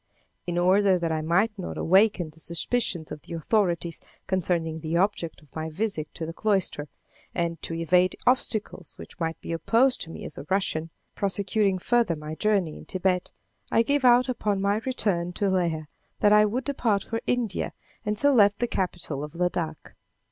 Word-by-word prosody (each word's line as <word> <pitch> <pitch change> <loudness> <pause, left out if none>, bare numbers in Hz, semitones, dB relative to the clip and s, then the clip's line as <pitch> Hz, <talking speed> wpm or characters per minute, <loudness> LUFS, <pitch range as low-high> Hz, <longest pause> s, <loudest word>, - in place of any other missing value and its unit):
In 175 0 -1
order 190 +2 +4
that 170 -2 -1
I 160 -1 0
might 175 +8 +2
not 180 - -5
awaken 190 -3 +3
the 160 - -18
suspicions 170 +1 -1
of 150 - -6
the 170 - -10
authorities 170 -1 0 0.2
concerning 170 -4 0
the 160 +1 -1
object 175 -5 -1
of 145 - -25
my 160 0 -3
visit 160 -3 -3
to 165 - -4
the 165 - -6
cloister, 190 -8 0 0.5
and 170 -1 -1
to 165 - -4
evade 180 +2 +3
obstacles 215 -7 0
which - - -12
might 165 -1 -2
be - - -6
opposed 235 +10 +2
to 165 - -4
me - - -8
as 145 - -7
a 140 - -9
Russian, 175 -4 0 0.2
prosecuting 200 0 +1
further 230 -2 +2
my 150 0 -7
journey 195 -3 0
in - - -12
Thibet, 185 -1 0 0.4
I 230 - +4
gave 285 +3 +1
out 250 0 +6
upon 210 -5 -1
my 200 +1 +2
return 180 -9 0
to 200 +1 0
Leh 170 -4 0 0.4
that 210 0 +5
I 210 0 +7
would 240 +5 -1
depart 230 -8 0
for 225 0 -3
India, 235 -6 -1 0.3
and 210 0 -1
so 285 +5 +4
left 205 -4 +5
the 240 - 0
capital 175 -8 -3
of 150 +1 -8
Ladak. 170 -3 -2
185 Hz, 180 wpm, -26 LUFS, 165-210 Hz, 0.5 s, I